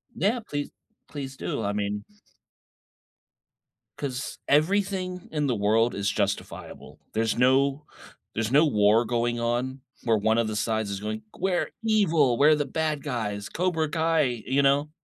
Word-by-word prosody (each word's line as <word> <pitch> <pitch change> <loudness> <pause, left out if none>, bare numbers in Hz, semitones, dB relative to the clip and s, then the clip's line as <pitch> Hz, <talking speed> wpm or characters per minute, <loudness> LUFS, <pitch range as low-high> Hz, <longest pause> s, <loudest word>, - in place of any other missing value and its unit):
Yeah, 225 +6 +1
please 145 0 -3 0.4
please 135 -3 -6
do. - - -3
I 100 0 -1
mean 105 0 -2 1.9
'Cause 135 -2 -4
everything 185 +3 +1
in 150 -2 0
the 125 - +1
world 110 +3 +2
is 100 0 0
justifiable. - - -4
There's 110 0 +1
no 135 +3 +3 0.5
there's 115 +1 -1
no 150 +4 +6
war 105 -2 +4
going 120 0 0
on, 125 +3 -1 0.2
where 115 -2 +3
one 110 +2 +2
of 115 -1 +2
the 110 - -3
sides 110 -1 -1
is 100 - -3
going, 110 +1 -4
"We're 185 -1 -1
evil. 165 - +3
We're 150 +2 +6
the 150 -1 0
bad 155 0 -1
guys. 105 -7 -3
Cobra 165 -3 0
Kai." 155 -8 +1
You 135 +2 +2
know? 140 +2 +3
130 Hz, 150 wpm, -26 LUFS, 110-155 Hz, 1.9 s, no